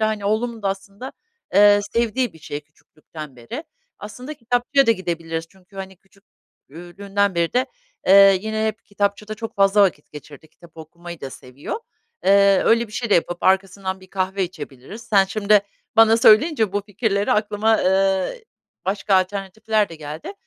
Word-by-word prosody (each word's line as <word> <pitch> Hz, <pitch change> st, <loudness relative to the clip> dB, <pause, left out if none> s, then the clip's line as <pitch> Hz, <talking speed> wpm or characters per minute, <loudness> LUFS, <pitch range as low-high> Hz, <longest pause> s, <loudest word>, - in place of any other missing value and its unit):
da, 215 Hz, -, +2 dB
hani, 210 Hz, -2 st, -4 dB
oğlumun 220 Hz, +1 st, -1 dB
da 195 Hz, -, 0 dB
aslında, 200 Hz, +5 st, -7 dB, 0.4 s
eee, 205 Hz, 0 st, +6 dB
sevdiği 235 Hz, -1 st, 0 dB
bir 160 Hz, -, -16 dB
şey 150 Hz, -1 st, -6 dB
küçüklükten 150 Hz, -1 st, -13 dB
beri. 240 Hz, -, -8 dB, 0.3 s
Aslında 250 Hz, +8 st, -9 dB
kitapçıya 245 Hz, +2 st, +1 dB
da -, -, +5 dB
gidebiliriz 165 Hz, -4 st, -4 dB
çünkü, 190 Hz, +1 st, -21 dB
hani, 190 Hz, -1 st, -8 dB
küçük 195 Hz, +1 st, -29 dB, 0.4 s
ü 175 Hz, +4 st, -12 dB
lüğünden 200 Hz, -1 st, 0 dB
beri 170 Hz, -1 st, 0 dB
de, 255 Hz, +1 st, +1 dB, 0.4 s
eee, 195 Hz, 0 st, +7 dB
yine 220 Hz, +1 st, -2 dB
hep 220 Hz, +1 st, -4 dB
kitapçıda 205 Hz, +1 st, -2 dB
çok 225 Hz, +1 st, -7 dB
fazla 200 Hz, +1 st, +4 dB
vakit 165 Hz, -7 st, -1 dB
geçirdi. 150 Hz, +1 st, -12 dB
Kitap 165 Hz, +1 st, -20 dB
okumayı 170 Hz, +1 st, -11 dB
da 135 Hz, -, -6 dB
seviyor. 135 Hz, -, -8 dB, 0.4 s
Eee, 200 Hz, 0 st, +5 dB
öyle 230 Hz, +1 st, +3 dB
bir 210 Hz, -, -17 dB
şey 235 Hz, -1 st, -4 dB
de -, -, +5 dB
yapıp 175 Hz, +1 st, 0 dB
arkasından 190 Hz, 0 st, 0 dB
bir 185 Hz, -, -15 dB
kahve 190 Hz, 0 st, -1 dB
içebiliriz. 155 Hz, -, -10 dB
Sen 200 Hz, -4 st, +3 dB
şimdi 205 Hz, +1 st, +2 dB, 0.3 s
bana 225 Hz, 0 st, +6 dB
söyleyince 225 Hz, -, +4 dB
bu 205 Hz, -, 0 dB
fikirleri 205 Hz, 0 st, -1 dB
aklıma, 215 Hz, +1 st, +1 dB
ııı, 190 Hz, -, +1 dB, 0.5 s
başka 195 Hz, +1 st, 0 dB
alternatifler 200 Hz, +3 st, 0 dB
de 165 Hz, -, -10 dB
geldi. 155 Hz, -, -8 dB
200 Hz, 165 wpm, -21 LUFS, 175-215 Hz, 0.5 s, eee